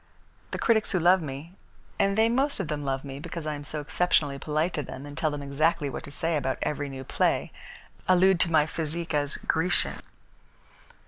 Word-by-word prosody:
The - - -4
critics 220 -2 +2
who 185 - +3
love 180 +2 +5
me, 150 +4 -7 0.4
and 195 +1 +2
they 220 +1 +5
most 270 +4 +1
of 180 -6 -3
them 150 -1 -2
love 135 -1 -2
me 135 0 -7
because 170 +1 -6
I 155 - -1
am 145 0 -6
so 150 +1 -4
exceptionally 145 -3 +1
polite 155 +4 0
to 150 - -1
them, 135 0 -8
and 145 0 -9
tell 155 - +1
them 145 -1 -5
exactly 145 +1 +1
what - - -6
to 140 - -10
say 165 +2 0
about 135 -2 -1
every 145 -1 -2
new 135 -1 -7
play, - - 0 0.6
allude 185 0 +5
to 170 - +4
my 155 -2 +5
physique 160 +1 -4
as 145 0 0
Grecian." 175 +2 +1
155 Hz, 200 wpm, -27 LUFS, 145-175 Hz, 0.6 s, love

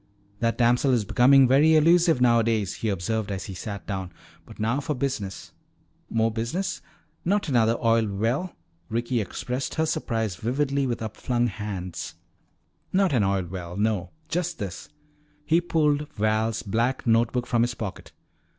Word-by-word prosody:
"That 115 0 0
damsel 125 +2 +3
is 115 -4 +1
becoming 130 +5 +6
very 145 +5 +5
elusive 165 -1 +5
nowadays," 115 -5 +2
he 110 - -2
observed 105 +3 -2
as 95 -1 -4
he 95 - -7
sat 100 +1 -6
down. 95 -3 -4 0.4
"But - - -13
now 115 +6 +1
for 150 +1 -2
business." 120 -8 -4 0.6
"More 115 0 +1
business? 145 - -3 0.4
Not 200 +2 +1
another 115 -4 +3
oil 115 -1 +2
well!" 115 - -1 0.3
Ricky 120 +1 0
expressed 125 +6 -4
her 160 - +1
surprise 115 - -2
vividly 140 +5 0
with 120 -2 -3
upflung 120 +2 -1
hands. 100 -7 -5 0.8
"Not 190 -3 +2
an 120 -5 +3
oil 95 -1 +1
well, 90 0 -7
no. 105 -4 0 0.2
Just 175 +1 -2
this 95 -5 -6 0.3
" 150 0 -37
He 165 +2 +3
pulled 150 -3 +1
Val's 110 +1 0
black 115 +5 -1
note 115 0 +3
book 125 -1 -1
from 120 -2 +1
his 120 0 0
pocket. 105 -4 -6
115 Hz, 155 wpm, -25 LUFS, 105-140 Hz, 0.8 s, becoming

